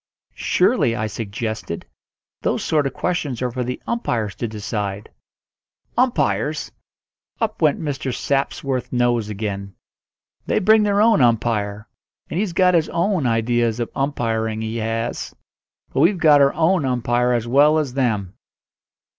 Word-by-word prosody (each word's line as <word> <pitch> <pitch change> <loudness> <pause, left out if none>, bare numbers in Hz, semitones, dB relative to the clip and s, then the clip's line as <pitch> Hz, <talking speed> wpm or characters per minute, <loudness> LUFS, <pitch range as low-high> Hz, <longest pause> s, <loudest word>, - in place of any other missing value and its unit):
"Surely," 115 -1 +2
I 110 - -2
suggested, 110 -3 -4 0.6
"those - - -1
sort 150 -3 +1
of 135 - -5
questions 150 -9 -2
are 125 - -1
for 125 +1 -2
the 125 +1 -4
umpires 115 - -1
to 120 - -2
decide." 105 -1 -4 0.8
"Umpires!" 250 0 0 0.7
Up 220 -4 -2
went 155 -3 +3
Mr. 140 -4 -3
Sapworth's 135 0 -2
nose 120 -3 +1
again. 100 -2 -5 0.7
"They - - +1
bring 215 +2 +5
their 205 -1 +2
own 220 -8 +4
umpire, 110 -3 +1 0.4
and 170 - -1
he's 200 -4 -1
got 180 0 +4
his 165 -2 +2
own 170 -5 0
ideas 115 0 +1
of 120 - -3
umpiring, 115 -5 -1
he 110 +1 -3
has. 115 +1 -3 0.6
But 130 - 0
we've 175 +7 +4
got 150 -4 +5
our 140 0 +4
own 165 +1 +2
umpire 125 -1 +1
as 120 -1 -1
well 145 +5 +5
as 145 -5 -1
them." 110 -8 -1
125 Hz, 140 wpm, -21 LUFS, 110-155 Hz, 0.8 s, bring